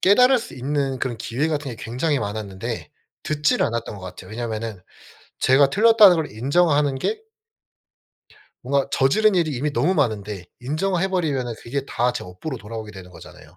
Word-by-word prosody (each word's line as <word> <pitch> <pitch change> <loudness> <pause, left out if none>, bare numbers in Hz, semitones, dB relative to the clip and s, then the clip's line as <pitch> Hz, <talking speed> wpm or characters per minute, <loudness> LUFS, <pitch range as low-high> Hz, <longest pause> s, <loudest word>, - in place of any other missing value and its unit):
깨달을 250 +7 +5
수 235 - -8
있는 135 0 -2
그런 120 -2 -2
기회 120 +8 -1
같은 145 -3 -2
게 115 - -7
굉장히 135 +5 -1
많았는데 100 -2 -5 0.3
듣지를 150 -1 +1
않았던 115 -2 -4
것 - - -11
같아요. 90 +3 -9
왜냐하면은 110 -3 -4 0.6
제가 135 +1 +5
틀렸다는 215 -1 +7
걸 160 - -2
인정하는 145 +4 +2
게 435 - -2 1.4
뭔가 140 +2 0
저지른 200 +12 +3
일이 170 -3 +2
이미 140 +3 -2
너무 175 +6 +2
많은데 105 - -1 0.2
인정을 170 +8 -1
해버리면은 150 -11 -1
그게 135 +3 -3
다 120 +1 0
제 - - -5
업보로 90 - -6
돌아오게 110 0 -7
되는 90 -2 -11
거잖아요. 90 -1 -14
135 Hz, 380 characters per minute, -22 LUFS, 110-155 Hz, 1.4 s, 틀렸다는